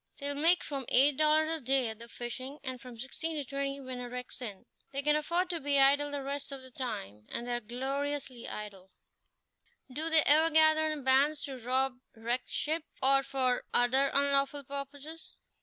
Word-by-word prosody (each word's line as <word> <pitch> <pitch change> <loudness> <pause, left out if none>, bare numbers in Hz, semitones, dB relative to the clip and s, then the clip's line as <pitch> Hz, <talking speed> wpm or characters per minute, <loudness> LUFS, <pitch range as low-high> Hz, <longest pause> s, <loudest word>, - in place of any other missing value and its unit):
They'll 285 0 -4
make 330 +5 +3
from 275 -3 -5
eight 275 +3 +5
dollars 310 0 +3
a - - -20
day 260 0 +2
at 220 0 -8
the 235 - -10
fishing, 255 +4 -6
and 255 -3 -5
from 250 -3 -11
sixteen 315 +7 -4
to 295 - -2
twenty 275 +1 -3
when 255 -2 -7
a 245 -1 -6
wreck's 250 0 -6
in. 205 -6 -7 0.3
They 280 0 -3
can 300 +1 +3
afford 345 +4 0
to 340 - -3
be 285 -1 +1
idle 280 +2 +5
the 285 -1 -4
rest 280 +1 -4
of 270 -1 -7
the 260 - -12
time, 105 - -6
and 235 - -4
they 245 - -2
are 240 - -1
gloriously 265 +2 -4
idle." 200 -3 -8 1.0
"Do 315 +4 0
they 320 -2 +6
ever 315 +3 +5
gather 315 0 +5
in 305 -3 -4
bands 275 +3 +3
to 270 -2 -6
rob 255 +2 0 0.2
wrecked 235 +3 -3
ships, 315 +1 -1 0.2
or 275 +1 +6
for 260 -2 0
other 265 +3 +5
unlawful 280 0 +2
purposes?" 280 +4 -8
275 Hz, 190 wpm, -31 LUFS, 250-290 Hz, 1.0 s, they